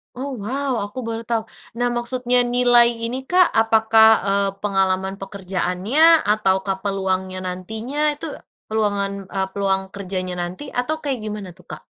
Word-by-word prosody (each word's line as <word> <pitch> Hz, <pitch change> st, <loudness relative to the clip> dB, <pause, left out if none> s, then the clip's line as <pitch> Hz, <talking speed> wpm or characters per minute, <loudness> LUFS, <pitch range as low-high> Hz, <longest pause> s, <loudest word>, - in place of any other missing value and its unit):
Oh, 265 Hz, +1 st, -4 dB
wow, 270 Hz, +4 st, -2 dB
aku 205 Hz, +5 st, -6 dB
baru 230 Hz, 0 st, -4 dB
tahu. 230 Hz, 0 st, -1 dB, 0.4 s
Nah, 245 Hz, -, +2 dB
maksudnya 245 Hz, +1 st, +1 dB
nilai 245 Hz, -1 st, +4 dB, 0.2 s
ini, 255 Hz, +3 st, -3 dB
Kak, 360 Hz, +4 st, +4 dB
apakah, 220 Hz, 0 st, +5 dB, 0.2 s
eee, 200 Hz, 0 st, +2 dB
pengalaman 190 Hz, -1 st, 0 dB
pekerjaannya 195 Hz, -, +2 dB
ataukah 195 Hz, -2 st, +1 dB
peluangnya 190 Hz, -1 st, -1 dB
nantinya 220 Hz, +11 st, -2 dB
itu, 295 Hz, +2 st, -6 dB, 0.4 s
peluangan 205 Hz, -2 st, 0 dB, 0.2 s
e -, -, -2 dB
peluang 195 Hz, -1 st, 0 dB
kerjanya 185 Hz, -2 st, -4 dB
nanti 180 Hz, +10 st, -6 dB, 0.2 s
atau 310 Hz, +5 st, -1 dB
kayak 270 Hz, -5 st, -2 dB
gimana, 210 Hz, -3 st, -5 dB
tuh, 180 Hz, -, -19 dB
Kak? 155 Hz, -, -8 dB
215 Hz, 140 wpm, -21 LUFS, 190-245 Hz, 0.4 s, apakah